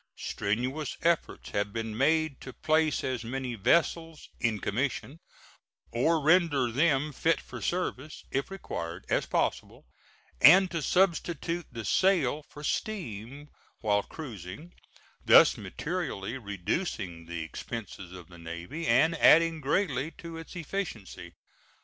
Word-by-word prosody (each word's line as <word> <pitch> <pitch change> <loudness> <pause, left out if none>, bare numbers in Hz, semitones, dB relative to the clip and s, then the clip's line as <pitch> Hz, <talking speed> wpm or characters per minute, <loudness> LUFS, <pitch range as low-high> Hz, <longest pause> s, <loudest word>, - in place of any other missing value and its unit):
Strenuous 125 +9 -2
efforts 170 0 0
have 100 0 -1
been 110 0 -4
made 155 +3 +1
to 130 - -8
place 155 -2 +1
as 130 -2 -2
many 130 +1 -4
vessels 165 - +1
"in 115 -2 +1
commission," 130 +8 -2 0.7
or 160 +8 +2
render 150 -5 +3
them 150 +2 +2
fit 165 +4 +2
for - - -9
service 155 -5 -3
if 135 +6 -1
required, 85 - -6
as - - +1
possible, - - -2 0.6
and 185 +4 +8
to 165 - -2
substitute 175 -1 0
the 115 -3 -6
sail 165 -7 +2
for 150 - -11
steam 145 - -4 0.3
while 105 -2 +2
cruising, 120 - -9 0.5
thus - - +7
materially 150 - -4
reducing 100 - -3
the 85 -1 -4
expenses 95 +1 -7
of 90 -2 -10
the 85 -2 -14
Navy 85 - -6
and 150 +8 +4
adding 165 0 +5
greatly 140 -1 0
to 165 -1 -8
its 165 +2 -9
efficiency. 170 - -5
140 Hz, 125 wpm, -29 LUFS, 110-165 Hz, 0.7 s, and